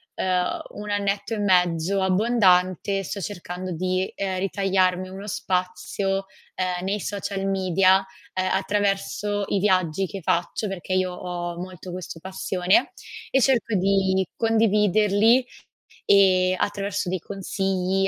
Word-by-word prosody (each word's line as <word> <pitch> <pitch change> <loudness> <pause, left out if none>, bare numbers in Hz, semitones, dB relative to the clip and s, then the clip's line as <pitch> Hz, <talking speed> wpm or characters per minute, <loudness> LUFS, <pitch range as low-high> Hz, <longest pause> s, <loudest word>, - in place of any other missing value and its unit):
ehm, 180 -1 0
1 210 0 -7
annetto 200 +1 -1
e 215 - -2
mezzo 180 -1 +2
abbondante 190 -2 +2
sto 200 - -5
cercando 180 0 -5
di, 185 +2 -1
ehm, 190 -2 -2
ritagliarmi 185 -1 +1
uno 195 +2 -8
spazio, 195 +1 -2 0.3
ehm, 180 -1 -2
nei 205 +2 -1
social 195 0 -3
media, 190 0 +3 0.3
ehm, 185 0 -1
attraverso 205 +1 0
i - - 0
viaggi 185 -2 +1
che 195 +1 -7
faccio, 175 +6 -1
perché 190 -1 -4
io 185 -1 +1
ho 175 -1 -5
molto 180 0 -8
questo 180 -2 -7
passione 190 - 0 0.4
e 270 - +3
cerco 235 -4 +2
di 190 0 +2
condividerli, 215 +1 +3 0.6
ehm, 185 -2 +4
attraverso 200 -2 -2
dei 185 -1 -1
consigli, 195 0 -1
190 Hz, 125 wpm, -24 LUFS, 185-200 Hz, 0.6 s, ehm